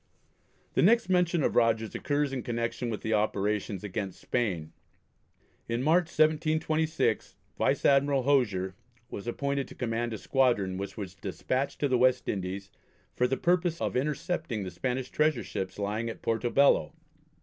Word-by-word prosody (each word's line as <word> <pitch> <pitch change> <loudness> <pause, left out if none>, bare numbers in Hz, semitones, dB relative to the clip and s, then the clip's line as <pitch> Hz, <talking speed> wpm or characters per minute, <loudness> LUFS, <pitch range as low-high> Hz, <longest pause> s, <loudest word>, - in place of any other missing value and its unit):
The - - +2
next 230 +3 +4
mention 180 -3 +2
of - - +1
Rogers 115 -2 +2
occurs 145 -1 -1
in 130 - -2
connection 120 +1 -2
with 110 - -4
the 110 - -1
operations 105 -1 0
against 100 -1 -4
Spain. 90 -10 -2 1.0
In 115 +2 -1
March, 165 +4 +4
1726, 155 0 +1 0.2
Vice - - +1
Admiral 140 -1 +4
Hosier 105 -9 +2 0.4
was 100 - -6
appointed 140 +2 -1
to - - -12
command 120 -1 -2
a 110 - -3
squadron 110 -8 +1
which 100 +3 -6
was 95 -4 -5
despatched 130 +8 -3
to 145 - +3
the 130 -2 +2
West 130 0 +3
Indies 95 0 -3 0.4
for 125 - +2
the 135 +1 -1
purpose 175 +1 +1
of - - -2
intercepting 150 - -1
the 95 - -5
Spanish 125 +7 -3
treasure 150 -6 +2
ships 95 -1 -5
lying 105 +3 -2
at 115 - -8
Porto 115 +1 0
Bello. 125 - +4
125 Hz, 155 wpm, -29 LUFS, 105-145 Hz, 1.0 s, next